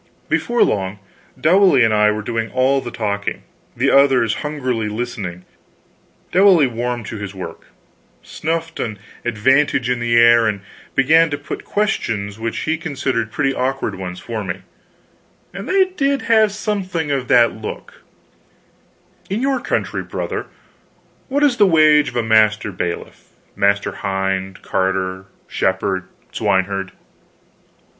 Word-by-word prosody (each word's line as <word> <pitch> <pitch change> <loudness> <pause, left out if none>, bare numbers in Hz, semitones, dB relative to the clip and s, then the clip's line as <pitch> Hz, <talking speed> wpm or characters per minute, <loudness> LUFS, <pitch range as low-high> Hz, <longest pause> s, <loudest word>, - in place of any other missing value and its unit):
Before 240 0 +2
long, 95 0 -1 0.4
Dowley 180 -5 +5
and 110 -1 +3
I 105 0 +4
were 105 0 -2
doing 115 0 -2
all 135 +1 +2
the 120 - -6
talking, 100 -3 -3 0.3
the - - +2
others 135 -5 +4
hungrily 130 -7 -2
listening. 105 -6 -5 0.9
Dowley 185 -4 +6
warmed 120 -1 -3
to 110 - -6
his 100 -1 -7
work, 90 -3 -8 0.6
snuffed 165 +1 -4
an 105 -3 -3 0.3
advantage 125 +2 +2
in 125 - 0
the 120 0 +1
air, 115 -1 +6
and 100 -2 -2 0.3
began 160 +5 +4
to 145 - -2
put 145 - -7
questions 110 - -2
which 115 0 -3
he 160 +1 -1
considered 130 -8 -2
pretty 135 +1 0
awkward 135 +1 -2
ones 90 -1 -6
for 115 -3 -5
me, 90 -3 -5 0.9
and 195 - -7
they 380 0 +4
did 280 -7 -1
have 220 -2 +4
something 190 -7 -2
of 135 -3 -1
that 120 -2 +5
look: 110 0 -8 1.3
"In 200 +3 -1
your 270 -1 +1
country, - - -2
brother, - - -4 0.8
what 285 +2 0
is 270 -4 +3
the 205 -2 +5
wage 155 -3 +5
of - - -13
a 120 - +1
master 110 -1 +3
bailiff, 85 -2 -5 0.3
master 100 0 +1
hind, 95 -1 -3
carter, 95 0 -1 0.2
shepherd, 95 0 -1 0.3
swineherd?" 95 0 0
120 Hz, 135 wpm, -19 LUFS, 105-155 Hz, 1.3 s, Dowley